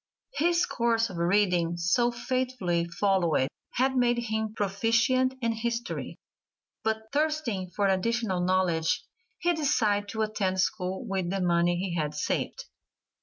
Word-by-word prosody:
His 340 0 +2
course 230 -2 +1
of 180 - -7
reading, 175 -1 +2
so 180 +8 +2
faithfully 240 -8 -1
followed, 170 -6 +1 0.2
had 260 +2 +1
made 240 -1 +3
him 220 -2 -2
proficient 230 +6 +2
in 230 - +2
history, 235 +1 -3 0.7
but 220 0 -2
thirsting 290 - 0
for 200 +3 -1
additional 195 +1 +1
knowledge 180 -3 +1 0.3
he 350 0 +1
decided 225 -10 +1
to 220 +1 -1
attend 195 -3 -1
school 185 +3 -1
with 190 -4 -2
the 195 +1 -1
money 175 -1 +2
he 185 0 -2
had 150 -3 -2
saved. 150 - -2
210 Hz, 130 wpm, -28 LUFS, 180-240 Hz, 0.7 s, made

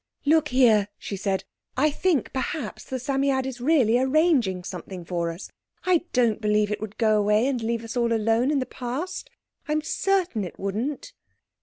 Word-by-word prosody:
"Look 310 +1 +4
here!" 235 -6 +4
she 200 - -6
said. 195 0 -1 0.3
"I 300 +3 +3
think 320 -4 0
perhaps 260 -4 -4
the 260 - -4
Psammead 270 0 0
is 255 -2 -6
really 250 -5 +3
arranging 260 - +2
something 180 0 -7
for 170 -1 -2
us. 165 +3 -8 0.3
I 355 -2 +3
don't 235 -4 +2
believe 210 -1 +2
it 210 - -3
would 215 -1 -7
go 215 -2 +3
away 210 +3 +3
and 265 -3 0
leave 230 0 -2
us 230 +1 -7
all 235 -1 +1
alone 225 +3 +2
in 295 - +2
the 260 - 0
Past. 265 +9 -5 0.4
I'm 305 0 0
certain 360 - 0
it 180 - -7
wouldn't." 240 - -3
245 Hz, 175 wpm, -25 LUFS, 210-285 Hz, 0.4 s, Look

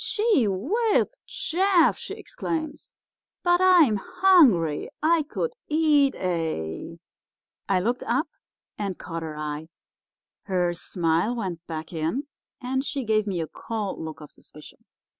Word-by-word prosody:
"'Gee 420 - +2
whiz, 405 - +1
Jeff!' 360 -1 +2
she - - -6
exclaims, 325 -10 -5 0.5
'but 350 0 +3
I'm 345 - +6
hungry. 290 - +4
I 330 +1 +4
could 385 +10 -3 0.2
eat 300 -3 +3
a—' 165 - -3 0.7
"I 190 -2 +3
looked 240 +6 -1
up 265 +6 +1 0.5
and 195 -3 -3
caught 165 0 -6
her 155 -2 -6
eye. 150 +1 -4 0.8
Her 180 -3 +1
smile 170 +6 0
went 185 -7 -4
back 160 0 -6
in 165 - -2 0.3
and 265 +2 -1
she 280 -1 -3
gave 215 -2 +1
me 185 -4 -1
a 160 - -3
cold 215 0 -5
look 160 -1 -7
of 150 - -11
suspicion. 150 - -16
220 Hz, 130 wpm, -25 LUFS, -, 0.8 s, I'm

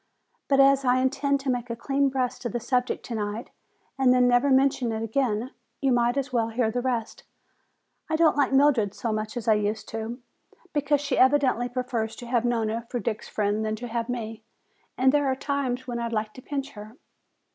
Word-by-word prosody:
But 275 -1 +3
as 275 0 +5
I 250 -1 +3
intend 280 +2 +1
to 270 -1 0
make 245 0 -3
a 235 - -3
clean 275 +3 +1
breast 255 -1 -2
of 240 - -2
the 240 - -1
subject 250 +2 -1
tonight 215 -1 -4 0.5
and 260 -2 +5
then 250 0 +4
never 245 +3 +3
mention 265 -2 +3
it 220 0 -3
again, 230 +1 -1 0.3
you 270 -1 +1
might 240 +1 +2
as 275 -1 -2
well 230 -2 +1
hear 225 -1 0
the 245 - -1
rest. 240 -3 -2 0.9
I 315 - +1
don't 320 0 +4
like 285 -1 +2
Mildred 270 -7 +3
so 230 - -2
much 215 +2 -3
as 230 - -5
I 220 - +6
used 210 0 -1
to, 225 +2 -5 0.5
because 290 -1 +1
she 280 -2 -1
evidently 260 -2 +3
prefers 245 -3 -3
to 245 - -9
have 240 -1 0
Nona 230 -1 -1
for 245 - -2
Dick's 225 -2 -4
friend 210 +1 0
than 215 0 -1
to 245 +3 -7
have 230 +1 -3
me. 225 -2 -4 0.6
And 260 +1 +4
there 290 0 +2
are 265 - +1
times 265 -2 -2
when 240 -1 -3
I'd 235 0 -3
like 215 -1 -2
to 255 - -11
pinch 275 0 -4
her." 215 0 -11
245 Hz, 205 wpm, -26 LUFS, 225-270 Hz, 0.9 s, I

